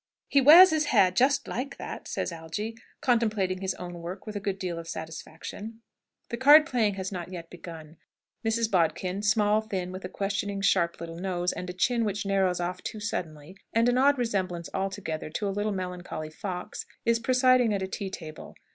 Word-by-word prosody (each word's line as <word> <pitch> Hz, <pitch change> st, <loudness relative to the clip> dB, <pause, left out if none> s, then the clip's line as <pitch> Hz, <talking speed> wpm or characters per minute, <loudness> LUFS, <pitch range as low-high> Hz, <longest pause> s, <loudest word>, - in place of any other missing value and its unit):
"He 280 Hz, -, +4 dB
wears 330 Hz, +7 st, +10 dB
his 310 Hz, -1 st, +1 dB
hair 190 Hz, -10 st, +4 dB
just 260 Hz, +9 st, +2 dB
like 265 Hz, +4 st, -4 dB
that!" -, -, -7 dB
says -, -, -2 dB
Algy, 170 Hz, +7 st, -5 dB, 0.3 s
contemplating 215 Hz, -8 st, +1 dB
his 190 Hz, -1 st, -1 dB
own 175 Hz, -1 st, -7 dB
work 180 Hz, +3 st, -7 dB
with 215 Hz, -1 st, -7 dB
a -, -, -1 dB
good 195 Hz, -1 st, -2 dB
deal 180 Hz, -3 st, -3 dB
of 165 Hz, -, -9 dB
satisfaction. 165 Hz, +7 st, -7 dB, 0.5 s
The 235 Hz, -, -3 dB
card 295 Hz, +4 st, +8 dB
playing 225 Hz, -9 st, +1 dB
has 190 Hz, 0 st, -4 dB
not 180 Hz, -1 st, -6 dB
yet 170 Hz, -2 st, -8 dB
begun. 165 Hz, -3 st, -10 dB, 0.5 s
Mrs. 225 Hz, 0 st, 0 dB
Bodkin, 180 Hz, +2 st, +1 dB
small, 210 Hz, 0 st, +3 dB
thin, 190 Hz, -4 st, -4 dB
with 185 Hz, +1 st, -7 dB
a 185 Hz, -, -5 dB
questioning, 200 Hz, 0 st, -2 dB
sharp, 185 Hz, -3 st, +2 dB
little 165 Hz, 0 st, -7 dB
nose, 180 Hz, -1 st, -1 dB
and 180 Hz, -, -6 dB
a -, -, -4 dB
chin 230 Hz, +6 st, +1 dB
which 205 Hz, -1 st, -2 dB
narrows 190 Hz, -2 st, +1 dB
off 180 Hz, +1 st, -3 dB
too 215 Hz, -, -6 dB
suddenly, 165 Hz, -6 st, -5 dB, 0.2 s
and 230 Hz, +1 st, +3 dB
an 245 Hz, +1 st, +3 dB
odd 285 Hz, +1 st, +5 dB
resemblance 190 Hz, -8 st, -2 dB
altogether 190 Hz, -5 st, -3 dB
to 200 Hz, +6 st, -3 dB
a 195 Hz, -, -1 dB
little 205 Hz, +2 st, -1 dB
melancholy 180 Hz, -4 st, -5 dB
fox, 180 Hz, +2 st, -6 dB, 0.2 s
is 230 Hz, 0 st, +3 dB
presiding 255 Hz, -1 st, +4 dB
at 200 Hz, -2 st, -1 dB
a -, -, -2 dB
tea 195 Hz, +1 st, -4 dB
table. 160 Hz, -5 st, -9 dB
195 Hz, 190 wpm, -28 LUFS, 180-225 Hz, 0.5 s, wears